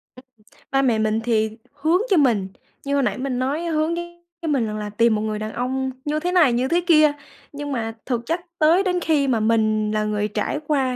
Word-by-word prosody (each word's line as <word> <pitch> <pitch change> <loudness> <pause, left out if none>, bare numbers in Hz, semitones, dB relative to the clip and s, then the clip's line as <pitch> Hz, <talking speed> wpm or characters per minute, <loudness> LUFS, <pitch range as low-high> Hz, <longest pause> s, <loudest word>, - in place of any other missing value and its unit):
Ưm, 255 - -15 0.5
ba 270 0 +3
mẹ 235 -5 +2
mình 215 0 +1
thì 220 -1 0
hướng 320 +6 +1
cho 380 - +4
mình, 230 -10 +3 0.4
như 280 - -1
hồi 280 -1 +2
nãy - - -1
mình 255 -1 -2
nói 275 +5 -1
hướng 320 0 0
với 345 0 -9
mình 275 -6 +1
rằng 215 - -4
là 210 -1 -4
tìm 230 +2 +2
một 210 - -1
người 215 -1 -2
đàn 215 0 -5
ông 260 +2 -2
như 300 +1 0
thế 355 +3 -2
này, 320 -9 +4
như 250 +2 +1
thế 345 +4 +2
kia. 305 -3 +6 0.4
Nhưng 290 0 -5
mà 225 -3 -2
thực 245 -3 -1
chất 330 +6 -1 0.2
tới 330 +5 +4
đến 360 -2 0
khi 300 -4 +1
mà 245 -4 +2
mình 215 -1 +1
là 215 0 0
người 210 0 -1
trải 210 +7 -2
qua 265 -4 +1
265 Hz, 230 wpm, -22 LUFS, 220-310 Hz, 0.5 s, kia